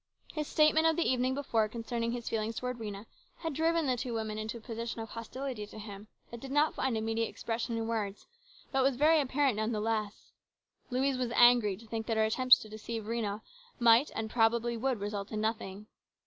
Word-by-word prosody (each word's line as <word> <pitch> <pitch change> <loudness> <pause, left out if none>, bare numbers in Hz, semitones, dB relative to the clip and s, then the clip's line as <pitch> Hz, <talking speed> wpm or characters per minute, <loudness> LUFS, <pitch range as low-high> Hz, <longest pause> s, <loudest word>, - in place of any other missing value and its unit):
His 305 -1 -3
statement 315 +1 +4
of 325 - +3
the 340 - +1
evening 255 0 +1
before 230 -6 0
concerning 230 +1 -3
his 240 -1 -5
feelings 225 0 -2
towards 250 0 -4
Rhena 205 -1 -6 0.3
had 325 -3 -4
driven 325 +2 +1
the 255 -2 +2
two 245 -1 -4
women 215 -1 -3
into 215 +2 -4
a - - -10
position 230 +1 -5
of 225 0 -6
hostility 230 0 -5
to 215 - -12
him 205 -1 -9 0.2
that 235 - -7
did 270 - -8
not 295 +3 +3
find 255 -4 -1
immediate 225 +1 0
expression 230 0 -3
in 225 - -2
words, 210 -3 -3 0.5
but 270 - +2
was 265 0 +3
very 305 +4 +5
apparent 270 -3 +1
none 220 +2 0
the 215 - -1
less. 215 -1 -3 0.6
Louise 260 +1 0
was 250 -2 0
angry 240 -5 +6
to 230 - -14
think 225 0 -4
that 225 -2 0
her 220 - +4
attempts 255 +3 +6
to - - -10
deceive 220 +1 -6
Rhena 215 -1 -2 0.4
might 235 +3 +5
and 220 0 -2
probably 235 +1 +2
would 250 0 -1
result 200 0 -4
in 215 - -2
nothing. 210 -2 -3
230 Hz, 205 wpm, -31 LUFS, 220-255 Hz, 0.6 s, angry